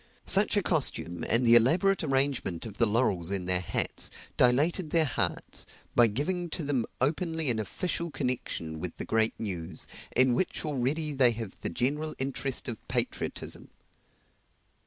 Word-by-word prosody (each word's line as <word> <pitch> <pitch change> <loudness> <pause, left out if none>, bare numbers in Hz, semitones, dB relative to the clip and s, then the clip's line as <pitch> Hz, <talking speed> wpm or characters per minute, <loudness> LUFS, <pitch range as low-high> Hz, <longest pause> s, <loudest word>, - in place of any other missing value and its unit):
Such - - +5
a - - +2
costume, 85 -1 +1
and 120 +2 +4
the 115 - +6
elaborate 170 - +4
arrangement 135 - -1
of 110 -3 -9
the 115 - +4
laurels 105 -6 +1
in 95 -2 -2
their 90 0 +1
hats, 90 - -1 0.3
dilated 150 +7 +3
their 160 0 +3
hearts, 120 -5 -2 0.3
by 120 -1 +6
giving 170 - -2
to 170 - -4
them 135 -5 -1
openly 160 +1 0
an 110 - -2
official 170 - -2
connection 125 - -3
with 90 +1 -5
the - - -4
great 110 0 +1
news, 90 -7 -2 0.3
in 130 -1 +4
which 175 +4 -1
already 150 +2 -1
they 130 -3 +4
have 110 -3 -6
the - - -1
general 150 - -2
interest 135 0 -2
of 115 -3 -4
patriotism. - - -3
125 Hz, 155 wpm, -28 LUFS, 110-150 Hz, 0.3 s, the